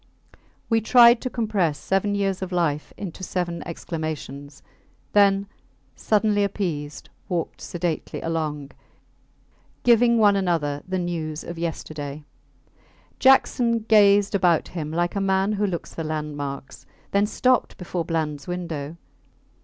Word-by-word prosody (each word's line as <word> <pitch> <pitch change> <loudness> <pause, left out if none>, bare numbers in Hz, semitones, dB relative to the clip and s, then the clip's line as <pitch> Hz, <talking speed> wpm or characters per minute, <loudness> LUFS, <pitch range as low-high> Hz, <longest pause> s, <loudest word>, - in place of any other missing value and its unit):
We 225 -1 +2
tried 235 +1 +6
to 255 - -3
compress 205 - 0
seven 195 +4 0
years 195 -2 -1
of 190 0 -4
life 160 -5 -1
into 190 -2 -7
seven 175 -2 -3
exclamations; 155 -4 -6 0.5
then, 200 -1 +4 0.5
suddenly 210 -1 +2
appeased, 165 -8 -3 0.2
walked 175 -3 -3
sedately 175 -2 -3
along, 150 -3 -3 1.1
giving 235 0 +5
one 205 -2 +5
another 165 -7 0
the 185 0 -1
news 165 -3 -3
of 170 -1 -7
yesterday. 155 -3 -5 1.0
Jackson 245 -3 +4
gazed 205 -1 +5
about 180 -4 +2
him, 160 -4 -5
like 175 +3 -1
a 200 - 0
man 195 +1 +1
who 205 0 0
looks 175 -3 -5
for 165 - -4
landmarks, 145 -3 -5 0.2
then 200 +1 +2
stopped 255 +3 +1
before 180 -1 -3
Blands 155 -4 -3
window. 170 -4 -5
175 Hz, 120 wpm, -24 LUFS, 155-205 Hz, 1.1 s, tried